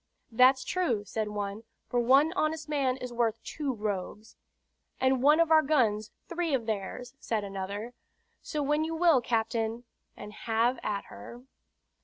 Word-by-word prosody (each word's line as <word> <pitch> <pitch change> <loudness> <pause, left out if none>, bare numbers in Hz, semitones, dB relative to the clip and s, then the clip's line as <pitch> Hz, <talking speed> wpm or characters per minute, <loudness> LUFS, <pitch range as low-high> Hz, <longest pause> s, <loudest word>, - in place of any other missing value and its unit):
"That's 255 +3 +5
true," 245 - -1
said 215 0 -3
one, 205 +1 -4 0.2
"for 245 - 0
one 270 +7 +4
honest 315 -3 -1
man 275 -4 0
is 250 -2 -7
worth 230 -2 +1
two 290 -3 -3
rogues." 210 -1 -5 0.6
"And 260 -1 +2
one 300 +4 +5
of 335 -1 +3
our 315 0 +7
guns, 225 -8 +1 0.2
three 340 -4 -1
of 235 -4 -3
theirs," 220 +4 -4
said 220 -3 -2
another. 200 +4 -5 0.5
"So 300 -2 -3
when 295 +2 +1
you 325 +1 -3
will, 325 -6 +4
captain, 230 0 -1 0.3
and 210 - -9
have 235 +3 0
at 200 -1 -2
her." 240 +1 -11
245 Hz, 155 wpm, -29 LUFS, 215-295 Hz, 0.6 s, our